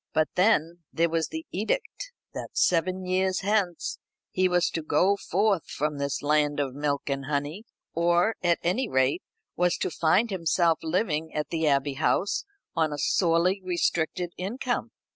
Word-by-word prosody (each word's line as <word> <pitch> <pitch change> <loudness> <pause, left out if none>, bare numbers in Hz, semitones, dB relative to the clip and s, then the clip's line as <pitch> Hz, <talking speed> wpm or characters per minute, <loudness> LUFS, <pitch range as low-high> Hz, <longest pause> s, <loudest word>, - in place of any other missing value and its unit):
But 155 -1 +2
then 175 -3 +2
there 170 +1 +1
was 165 -1 0
the 320 +1 -6
edict - - -3 0.2
that - - -7
seven 185 +2 +2
years 185 0 +1
hence 200 -4 0 0.3
he 185 0 +2
was 175 -1 +2
to 165 - -2
go 185 +5 +2
forth 200 -2 0
from 150 0 -2
this 140 0 -2
land 145 0 +2
of 135 -3 -1
milk 145 0 -1
and 140 -1 -2
honey; 145 +8 -3 0.3
or, 175 +5 +2
at 175 -1 +3
any 220 +9 0
rate, 130 +6 +2 0.3
was 180 0 +2
to - - -2
find 185 +9 +2
himself 170 -2 +2
living 160 -2 -1
at 150 0 -2
the 160 -2 0
Abbey 140 0 +2
House 195 +5 +1 0.3
on 160 -2 +1
a 145 - -4
sorely 175 +5 +2
restricted 175 -1 -1
income. 245 +7 -2
170 Hz, 160 wpm, -27 LUFS, 155-185 Hz, 0.3 s, at